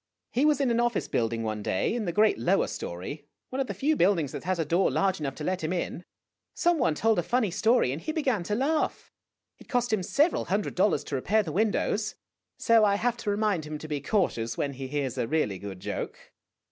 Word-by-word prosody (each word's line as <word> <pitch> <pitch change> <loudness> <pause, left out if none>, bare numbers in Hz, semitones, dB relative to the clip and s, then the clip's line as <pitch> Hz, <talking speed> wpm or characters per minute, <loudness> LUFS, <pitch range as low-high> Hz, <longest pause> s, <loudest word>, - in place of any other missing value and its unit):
He 260 +5 +2
was 300 -2 +3
in 270 -4 +2
an 235 - +2
office 240 -2 0
building 115 0 -1
one 110 -1 -3
day 95 - 0
in 235 -2 -2
the 175 - -1
great 210 - +3
lower 115 - +2
story, 140 - -6 0.2
one 260 - -3
of 270 - 0
the - - -4
few 305 +3 +1
buildings 170 - +2
that - - -7
has 185 0 0
a 165 - 0
door 170 +5 +2
large 195 -3 +1
enough 135 -3 -3
to 150 - -7
let 185 +1 -1
him 155 - -1
in. 180 -1 -3 0.5
Some 345 -2 +2
one 200 - +2
told 220 +3 +2
a - - +3
funny 225 +2 0
story, 220 - +3
and 145 +5 -4
he 315 - -3
began 270 - 0
to 210 - -1
laugh. 300 +6 -1 0.5
It - - -16
cost 245 -3 0
him 210 - +2
several 295 - +2
hundred 200 +2 -1
dollars 185 0 +2
to 140 - -4
repair 210 +11 +2
the 165 - -5
windows. 215 +2 0 0.4
So 230 -2 +4
I 200 -1 +4
have 240 +3 0
to 215 - -4
remind 205 -5 +1
him 155 0 -5
to 155 - -8
be 150 -2 -3
cautious 145 - 0
when 140 -1 -1
he 135 0 -6
hears 135 -2 -2
a 115 - 0
really 110 -11 0
good 100 -2 -7
joke." - - -6
190 Hz, 235 wpm, -27 LUFS, 145-230 Hz, 0.5 s, So